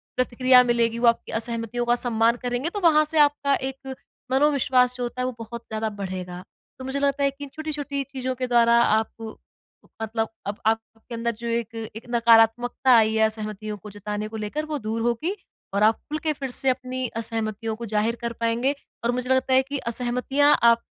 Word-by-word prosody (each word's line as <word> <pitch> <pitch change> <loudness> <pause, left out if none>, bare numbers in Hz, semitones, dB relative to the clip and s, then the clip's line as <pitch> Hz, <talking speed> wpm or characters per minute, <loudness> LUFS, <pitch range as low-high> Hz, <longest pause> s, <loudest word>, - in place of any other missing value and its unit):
प्रतिक्रिया 255 0 +4
मिलेगी, 235 -1 +1
वो 240 - +3
आपकी 235 - +2
असहमतियों 230 +1 -2
का 240 0 +3
सम्मान 235 -1 +2
करेंगे, 245 +5 -2
तो 410 - -4
वहाँ 310 -4 +5
से 315 +1 -4
आपका 285 -1 +3
एक 265 0 -6 0.4
मनोविश्वास 260 -3 +3
जो 245 - -3
होता 245 +1 -4
है - - 0
वो 255 - -1
बहुत 230 +1 -7
ज़्यादा 220 0 -2
बढ़ेगा। 185 -1 -5 0.4
तो 260 - -7
मुझे 270 +1 -2
लगता 280 0 +1
है 275 - +3
कि 280 +1 -11
इन 280 - -7
छोटी-छोटी 290 -3 -3
चीज़ों 260 -1 -4
के 255 0 -3
द्वारा 235 -1 +5
आप 220 0 0 0.7
मतलब 225 0 -2 0.2
अब 205 - -3
आपके 225 +1 -2
अंदर 235 0 -1
जो 235 - -5
एक 230 0 -2 0.2
एक 225 - -8
नकारात्मकता 235 +2 +4
आई 220 0 +3
है 220 - +3
असहमतियों 215 -1 -4
को 210 +2 -11
जताने 210 +1 -4
को 220 +1 -7
लेकर 215 +9 -3
वो 305 -1 -3
दूर 220 +1 -3
होगी 240 - -1 0.4
और 200 +1 +2
आप 220 +1 +5
खुल 305 - -2
के 310 -1 +1
फिर 270 -2 -5
से 270 - +2
अपनी 255 0 -2
असहमतियों 225 -1 -3
को 235 +1 -7
ज़ाहिर 215 +2 0
कर 235 0 -3
पाएँगे। 235 +5 +1 0.3
और 235 - +2
मुझे 250 +1 -3
लगता 260 0 +2
है 260 - +6
कि 280 +2 -4 0.2
असहमतियाँ 255 +4 +2
आप 235 0 +6
240 Hz, 200 wpm, -24 LUFS, 225-265 Hz, 0.7 s, है